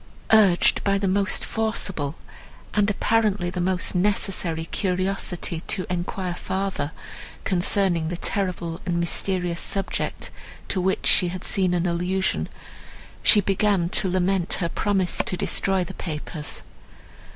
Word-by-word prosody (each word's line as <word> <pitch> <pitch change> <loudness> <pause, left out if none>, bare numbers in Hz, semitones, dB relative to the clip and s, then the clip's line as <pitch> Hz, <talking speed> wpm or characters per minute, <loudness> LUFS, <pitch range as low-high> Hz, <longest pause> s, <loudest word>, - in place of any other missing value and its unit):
Urged 200 -5 +5
by 200 0 +2
the 195 0 -1
most 200 +1 +1
forcible, 190 -9 -1 0.6
and 210 0 +2
apparently 210 -3 +1
the 180 -1 -3
most 185 0 0
necessary, 180 -4 0
curiosity 185 -2 -1
to 185 - -1
enquire 180 +1 -3
farther, 190 -5 -3 0.5
concerning 180 -2 +2
the 175 +1 -3
terrible 180 -4 -2
and 175 -2 -1
mysterious 175 0 -1
subject, 195 -1 -1 0.4
to 185 - 0
which 190 +1 0
she 180 - +5
had 180 +1 -5
seen 185 -3 +2
an 175 0 0
allusion, 180 +2 0 0.7
she 210 - +6
began 195 -2 +1
to 190 - +1
lament 185 0 +1
her 170 -3 -1
promise 195 -2 0
to 180 - 0
destroy 190 +1 +1
the 190 - -7
papers. 155 -3 -5
185 Hz, 130 wpm, -24 LUFS, 175-195 Hz, 0.7 s, she